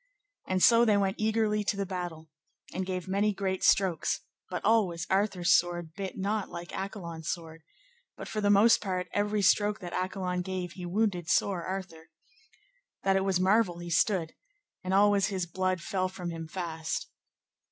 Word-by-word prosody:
And 185 -1 +1
so 235 0 +7
they 215 -3 +4
went 195 -1 0
eagerly 215 -1 +1
to 205 - -1
the 200 - -1
battle, 175 -4 -5 0.5
and 185 0 -3
gave 185 -1 -3
many 200 +2 +1
great 190 -1 -2
strokes, 185 -5 +2 0.3
but 180 - -4
always 195 -6 +2
Arthur's 190 -3 +2
sword 175 -2 0
bit 195 0 -6
not 200 +1 -1
like 170 +1 -7
Accolon's 170 -5 -5
sword; 165 -2 -5 0.6
but - - -7
for 215 - -3
the 205 - +2
most 205 +3 +6
part, 185 -2 -3
every 205 0 0
stroke 210 +2 +3
that 175 -2 -7
Accolon 185 0 -2
gave 180 -1 -4
he 175 0 -7
wounded 180 -3 0
sore 185 -4 +1
Arthur, 185 -4 -6 0.9
that 195 0 +3
it 195 - +2
was 190 -2 +1
marvel 190 -1 +3
he 175 0 -7
stood, 170 -2 +1 0.5
and 185 - -3
always 200 -1 +4
his 190 -3 -2
blood 185 +1 -1
fell 185 +1 -1
from 180 -2 -6
him 165 -1 -6
fast. 160 -2 -4
185 Hz, 170 wpm, -29 LUFS, 175-200 Hz, 0.9 s, so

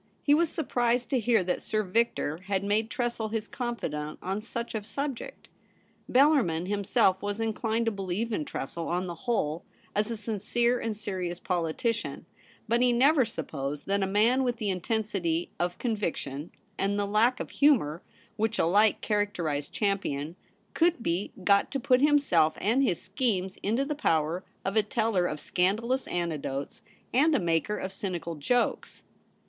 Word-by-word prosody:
He 285 - +4
was 330 +2 +3
surprised 245 -6 0
to 260 - +3
hear 230 -3 +3
that 180 0 -1
Sir 215 0 -1
Victor 190 -6 0
had 195 -1 0
made 215 +2 +1
Tressel 240 -4 -2
his 220 0 -3
confidant 190 - -4
on 195 +3 -2
such 235 +1 -5
a 220 - -2
subject. 275 +3 -5 0.6
Bel 280 +4 +6
larmin 175 - +1
himself 195 -1 +2
was 205 +1 -3
inclined 225 +1 0
to 225 - +2
believe 200 +3 -3
in 155 - 0
Tressel 165 +3 -5
on 180 +2 -1
the 175 - -4
whole 165 -5 -1 0.3
as 210 +2 +1
a 230 - -3
sincere 230 +3 0
and 220 -2 -3
serious 185 -4 -3
politician; 180 +6 -2 0.4
but 235 +2 +2
he 250 0 +4
never 265 +3 +4
supposed 145 -9 -5
that 200 +1 +1
a 195 - +1
man 225 +7 +3
with 245 -2 0
the 210 -3 -1
intensity 185 -3 -1
of 175 0 -1
conviction 170 - -3 0.3
and 200 +1 +1
the 205 - +1
lack 225 +5 +2
of - - -5
humour 205 - +3 0.4
which 220 +1 0
alike 205 +6 +3
characterized 180 -9 -1
Champion 175 -7 -1 0.4
could 335 -7 +2
be 175 +2 -1
got 200 +1 +4
to 275 - -2
put 250 +1 +3
himself 275 - +4
and 230 +7 +2
his 185 -11 +1
schemes 190 -2 -1
fnto 235 +7 +1
the 300 - -1
power 165 - 0 0.2
of 195 +2 -1
a 220 - +6
teller 210 -4 +1
of 150 - -4
scandalous 225 - 0
anec 170 -4 -2
dotes 135 +1 -5 0.3
and 295 +5 +4
a - - +3
maker 170 +4 0
of 190 0 -5
cynical 175 -4 -4
jokes. 240 - -1
205 Hz, 165 wpm, -28 LUFS, 175-235 Hz, 0.6 s, Bel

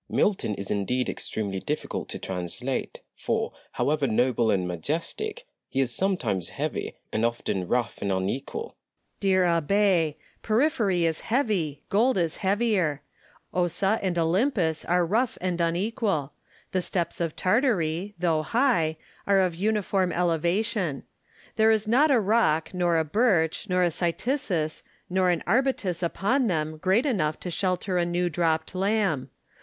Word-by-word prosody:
Delille. - - -6
Milton 185 - +1
is 100 - -6
indeed 120 +5 0
extremely 100 -3 -3
difficult 150 +9 -4
to - - -5
translate; 95 +8 -4
for, - - -2 0.2
however 145 -1 +1
noble 120 0 +2
and 95 -4 +1
majestic, 165 - -3 0.2
he 135 - -2
is 130 -3 +1
sometimes 120 - 0
heavy, - - -4 0.2
and 110 - 0
often 115 -6 -1
rough 120 -2 -1
and 100 - -1
unequal. 100 - -2
Landor. 460 - -13 0.4
Dear 190 -2 +3
Abb6! 170 -1 +2 0.3
porphyry 215 - +2
is 160 -1 0
heavy, 200 - -1
gold 230 +4 +3
is 170 -3 0
heavier; 195 -7 +1 0.5
Ossa 185 +4 +1
and 185 -3 -1
Olmypus 170 - +1
are 175 0 +3
rough 225 +7 0
and 180 -1 -1
unequal; 170 - 0 0.4
the 185 - +1
steppes 175 -1 -2
of 165 -2 -1
Tartary, 195 - +1
though 165 -3 +1
high, 170 - +1 0.3
are 200 -1 +4
of 185 -2 +2
uniform 195 -1 0
elevation: 175 - 0 0.5
there 220 0 +5
is 220 -1 +2
not 270 +8 +4
a 265 -4 +5
rock, 195 -8 +2
nor 175 -2 +2
a 160 - +1
birch, 185 -1 +1
nor 180 0 +3
a 175 - +2
cytisus, 175 - -1 0.3
nor 185 0 +3
an 175 -2 0
arbutus 220 -6 +1
upon 215 +9 +1
them 155 -4 -1
great 190 - +2
enough 155 - 0
to 180 - -4
shelter 185 +1 0
a - - +2
new 175 0 0
dropped 160 0 0
lamb. 190 - 0
175 Hz, 145 wpm, -26 LUFS, 155-205 Hz, 0.5 s, there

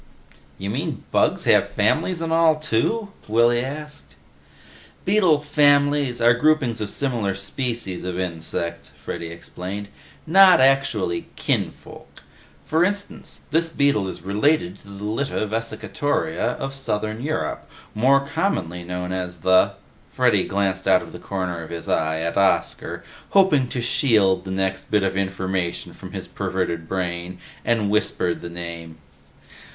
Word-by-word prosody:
"You 100 +1 -4
mean 145 +4 -3
bugs - - +2
have - - +4
families 175 -3 +1
and 165 0 -1
all, 165 -1 +5
too?" 155 - 0 0.2
Willy 120 +2 +3
asked. 145 - -8 0.9
"Beetle 185 -7 +4
'families' 145 -3 +3
are 120 0 +5
groupings 130 -3 +2
of 105 - -2
similar 115 -8 -1
species 100 -1 -3
of 90 0 -3
insects," 85 -2 -4
Freddy 85 - -7
explained. 90 +6 -7 0.4
"Not 185 +1 +7
actually 130 -10 +2
kinfolk. - - -4 0.4
For 160 +2 +2
instance, 200 +2 -3
this 165 +2 +2
beetle 140 -11 +2
is 95 - -6
related 150 - +1
to - - -18
the 100 0 -9
Lytta 110 +2 -1
vesicatoria 115 +8 -1
of 135 0 -4
southern 110 -4 -2
Europe, 155 +3 -3 0.2
more 135 +5 +4
commonly 95 - -1
known 90 +1 -4
as 90 -2 -4
the 95 +2 +4 0.2
" - - -31
Freddy - - +3
glanced 95 -1 -1
out - - +5
of - - -11
the - - -8
corner 90 -3 -3
of 80 - -9
his 85 -1 -6
eye 80 0 0
at 85 +2 -2
Oscar, 100 -1 +1 0.3
hoping 185 -10 +4
to 120 0 -3
shield 105 - +2
the - - -6
next 95 0 -2
bit 105 -2 +2
of 95 -1 0
information 95 -2 -2
from - - -11
his - - -5
perverted 85 -3 -3
brain, 90 -1 -3 0.3
and 110 -4 +1
whispered 95 -4 0
the 85 - -6
name. 85 -1 -7
105 Hz, 140 wpm, -23 LUFS, 90-145 Hz, 0.9 s, Not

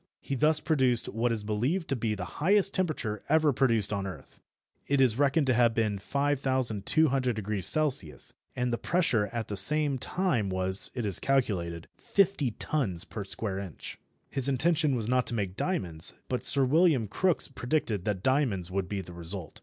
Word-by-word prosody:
He - - -6
thus 150 +3 +2
produced 130 -7 +2
what 115 +2 -1
is 110 -2 -3
believed 125 - -2
to 135 - 0
be 110 -3 -2
the 90 -3 -5 0.2
highest 195 +4 +3
temperature 145 - -2
ever 155 -1 +3
produced 115 -6 +4
on 100 -1 -3
earth. 80 -8 -11 0.5
It 140 0 +1
is 130 -2 +2
reckoned 145 +1 +2
to 130 - +2
have 120 -1 +2
been 110 -3 -1
5200° 130 - 0
C., 80 - -4 0.2
and 125 -1 -1
the 120 - -2
pressure 145 - 0
at 115 0 -5
the 105 - -4
same 145 +6 +4
time 150 - -1
was, 95 +1 -1
it 120 -3 -3
is 100 -4 +6
calculated, 90 -11 -1
50 195 -9 +1
tons 105 - -2
per 105 -1 -7
square 100 0 -4
inch. 95 -6 -8 0.3
His 135 0 +3
intention 150 +1 +1
was 115 -3 -3
not 125 0 +1
to 120 - -2
make 95 -4 -3
diamonds, 90 - -2
but 125 - -2
Sir 140 -1 +7
William 150 -4 +2
Crookes 180 - 0
predicted 125 - -2
that 100 -3 -2
diamonds 120 - 0
would 95 -1 -3
be 100 -2 -3
the 90 -1 -11
result. 85 0 -5
120 Hz, 175 wpm, -28 LUFS, 100-145 Hz, 0.5 s, Sir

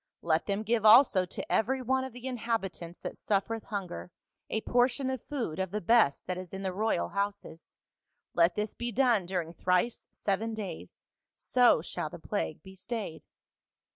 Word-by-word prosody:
Let 160 -1 +1
them 200 +1 -1
give 225 0 +1
also 215 -4 +7
to - - -6
every 260 +4 +2
one 260 +2 +1
of 265 - -5
the 245 +2 -10
inhabitants 220 -9 -3
that - - -6
suffereth 215 +2 -1
hunger 195 -4 -5 0.4
a 220 - -1
portion 250 +3 +2
of 260 -3 -4
food 235 - -4
of 190 -1 -1
the 210 +3 -2
best 215 -7 +3
that 180 0 -3
is 185 -1 -9
in 195 - -5
the 190 -1 -2
royal 215 +4 0
houses; 200 -4 -4 0.6
let 170 0 +4
this 210 0 -2
be 240 0 -4
done 235 -6 +3
during 175 -3 -2
thrice 180 +6 0
seven 220 +3 -2
days, 90 - -7 0.3
so - - +4
shall - - -3
the - - -9
plague 80 - -3
be 190 0 -12
stayed.' 200 -3 -5
205 Hz, 170 wpm, -30 LUFS, 180-235 Hz, 0.6 s, also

